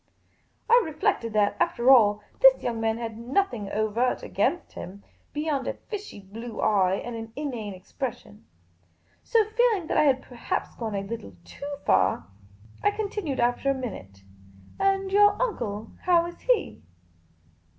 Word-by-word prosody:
I 475 +1 +6
reflected 315 - -1
that, 205 -1 +2
after 270 -8 +3
all, 210 -5 +5 0.2
this - - +7
young 230 -2 -2
man 225 0 +1
had 225 -1 -5
nothijig 240 - -1
overt 215 +4 0
against 350 - -1
him, 195 +3 -9 0.3
beyond 295 -2 -2
a - - -2
fishy 415 - -8
blue 220 +4 -9
eye 190 -3 +3
and 240 +4 -5
an 225 0 -7
inane 240 -9 -4
ex 185 +1 -18
pression; 235 -5 -6 0.8
so, 450 -2 +3
feeling 445 -6 +2
that - - -1
I - - +5
had 265 -2 +3
perhaps 245 -2 -4
gone 220 -3 -4
a 195 - -1
little 195 - -7
too 285 +1 -7
far, - - +3 0.6
I 410 - +4
continued, 410 -8 -3
after 245 +3 +1
a 275 - +2
minute, 100 - -7 0.3
" 95 - -22 0.2
And 390 0 +1
your 410 0 +5
uncle, 225 - -2
how 345 -2 +4
is 345 - -8
he?" - - 0
245 Hz, 155 wpm, -26 LUFS, 215-355 Hz, 0.8 s, this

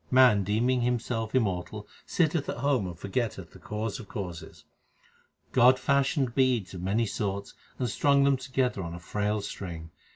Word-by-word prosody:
Man 125 -6 +6
deeming 120 +6 +1
himself 120 -1 -1
immortal 105 -2 -1 0.2
sitteth 160 -3 +1
at - - -3
home 130 -6 +1
and 85 -2 -7
for 90 - -7
getteth 115 +2 -2
the - - -14
Cause 105 0 -4
of 110 - -10
causes. 90 -5 -7 0.9
God 130 +1 +6
fashioned 140 -1 +1
beads 125 -8 +1
1 90 - -6
of 90 - -5
many 110 +5 +1
sorts 100 -2 -3 0.2
and 125 - -1
strung 140 +4 +3
them 140 0 +4
together 130 -4 -1
on 85 -1 -5
a - - -8
frail 105 +4 -1
string. 85 -5 -7
115 Hz, 170 wpm, -28 LUFS, 100-130 Hz, 0.9 s, Man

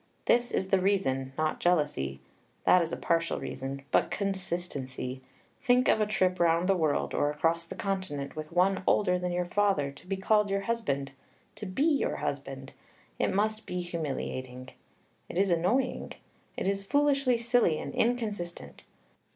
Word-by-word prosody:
This 240 0 +3
is 190 - -1
the 195 - +4
reason, 135 -9 +1
not 155 0 0
jealousy, 145 - 0 0.4
that 180 - +6
is 165 -1 -2
a - - -3
partial 165 0 0
reason, 135 +1 -5
but - - +3
consistency. 170 -10 -3 0.4
Think 250 -1 +4
of 220 - +4
a 210 - +2
trip 185 -3 +1
round 170 +1 +3
the 195 - +4
world 160 -5 0
or 145 - +2
across 165 +3 0
the - - -8
continent 185 -9 -3
with 155 +1 -6
one 185 +3 +2
older 180 -3 +3
than 180 0 -2
your 175 0 0
father, 185 -7 +1
to 140 +6 -16
be 195 0 -2
called 210 +1 +2
your 195 0 0
husband, 170 -12 -2 0.4
to 210 - -7
be 185 +10 -1
your 305 -3 +2
husband! - - -5 0.5
It - - +2
must 215 +2 0
be 180 0 -2
humiliating. 130 -6 -4 0.6
It - - -5
is 195 0 +3
annoying. 205 +10 0 0.4
It - - -1
is 195 0 0
foolishly 275 +1 +2
silly 235 -8 +2
and 140 - -6
inconsistent. 215 -8 -2
180 Hz, 160 wpm, -29 LUFS, 155-205 Hz, 0.6 s, that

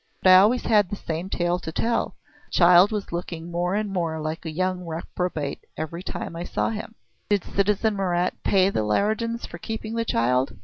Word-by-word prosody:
But 185 - +7
I 185 - +10
always 215 +6 +4
had 210 -5 +3
the 205 - -3
same 170 -1 -4
tale 175 -1 0
to 160 - -6
tell. 230 +8 -1 0.3
The - - -35
child 180 +3 +6
was 210 -2 -3
looking 170 -1 -5
more 175 +2 0
and 210 -1 -2
more 165 -3 -1
like 155 +2 -4
a - - -3
young 185 +2 -1
reprobate 165 -2 -4
every 165 +2 -4
time 175 - -5
I 170 - -4
saw - - -1
him." 220 +1 -6 0.3
"Did 205 -3 +2
citizen 210 +2 +1
Marat 180 -2 +1
pay 195 0 +3
the 110 - 0
Leridans 220 - 0
for - - -9
keeping 220 0 -5
the 230 0 0
child?" 125 - +1
180 Hz, 195 wpm, -24 LUFS, 170-205 Hz, 0.3 s, I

